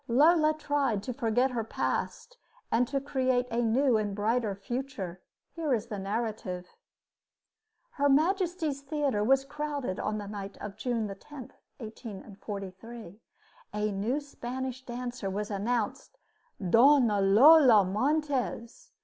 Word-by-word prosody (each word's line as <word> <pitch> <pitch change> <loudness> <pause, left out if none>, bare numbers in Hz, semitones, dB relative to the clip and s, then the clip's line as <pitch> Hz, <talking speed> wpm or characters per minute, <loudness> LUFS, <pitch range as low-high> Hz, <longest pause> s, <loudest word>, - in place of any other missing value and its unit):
Lola 310 +5 +4
tried 280 -9 0
to 250 - -4
forget 245 +3 +1
her 235 -2 -2
past 480 - -3 0.3
and 240 +2 +3
to 275 +2 -1
create 260 -2 0
a 235 +1 +1
new 240 +2 +3
and 205 -2 -2
brighter 215 0 0
future. 200 -4 -5 0.3
Here 310 -6 0
is 220 -1 -3
the 205 -3 -4
narrative: 200 -3 -3 1.3
Her 285 -1 +1
Majesty's 325 -1 +1
Theater 280 -7 -1
was 270 +4 +3
crowded 285 -8 -4
on 215 0 -2
the 205 - -5
night 200 -1 -7
of 205 -1 -7
June 230 -1 -2
10,1843. 215 - -9 0.6
A 210 0 0
new 215 +8 -1
Spanish 260 -2 -6
dancer 245 -4 -5
was 205 +2 -3
announced 235 - -2 0.5
"Dona 235 -1 +5
Lola 235 +2 +7
Montez." 275 - -1
240 Hz, 120 wpm, -29 LUFS, 210-280 Hz, 1.3 s, Lola